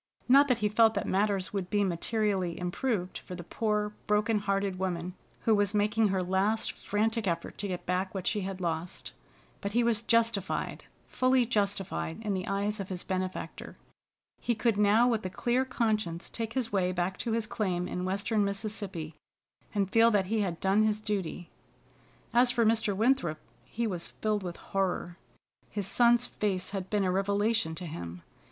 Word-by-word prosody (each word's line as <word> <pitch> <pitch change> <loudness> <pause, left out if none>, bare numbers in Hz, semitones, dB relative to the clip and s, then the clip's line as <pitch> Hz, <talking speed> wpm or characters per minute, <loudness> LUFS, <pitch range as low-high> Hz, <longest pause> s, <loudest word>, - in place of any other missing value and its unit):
Not 275 +3 +7
that 250 -3 +3
he - - +5
felt 220 +1 +4
that 200 - -1
matters 195 -1 0
would 190 -3 -2
be 205 -1 +2
materially 190 -1 0
improved 180 +1 -2
for 180 - -8
the 175 - -7
poor 210 +2 -1
broken 210 +1 +2
hearted 195 -2 -1
woman 180 -1 -2 0.3
who 225 - +3
was 205 0 +2
making 210 +1 +3
her 190 -2 0
last 195 +5 +1
frantic 220 +1 -1
effort 170 -1 -3
to 205 - -1
get 180 -2 -4
back 185 +1 0
what 190 -1 -3
she 210 - +1
had 190 0 -4
lost. 170 0 -3 0.5
But 200 0 -3
he 240 +1 +3
was 230 -1 +2
justified, 230 -4 +1 0.2
fully 255 -1 +3
justified, 200 -7 -1
in 210 -2 -1
the 185 -1 -3
eyes 205 +2 -1
of 195 - -5
his 180 -2 -2
benefactor. 185 0 -4 0.6
He 240 - 0
could 225 0 +1
now 210 +4 +5
with 230 -3 +1
a 185 - -2
clear 245 +7 0
conscience 215 -9 -1
take 225 -1 -3
his 255 -4 -1
way 185 -3 +1
back 180 +1 -1
to 230 - -1
his 225 -1 0
claim 185 -5 -1
in 180 - -3
western 200 +3 0
Mississippi, 200 -5 -3 0.6
and 200 -2 +1
feel 225 +4 +5
that 205 -4 +2
he 215 +3 0
had 180 -4 -2
done 195 +2 +3
his 215 -1 +2
duty. 195 -5 -3 0.8
As 245 +1 +5
for 240 -2 +2
Mr. 220 -2 +2
Winthrop, 215 -8 +2 0.3
he 235 +1 -3
was 180 -6 -2
filled 215 -1 -1
with 175 -2 -5
horror. 185 -2 -2 0.5
His 205 -2 -2
son's 240 +4 +4
face 190 -3 -2
had 190 -2 -4
been 205 -2 +1
a 185 - +1
revelation 200 -2 +1
to 180 - -6
him. 85 - -7
205 Hz, 180 wpm, -30 LUFS, 185-220 Hz, 0.8 s, Not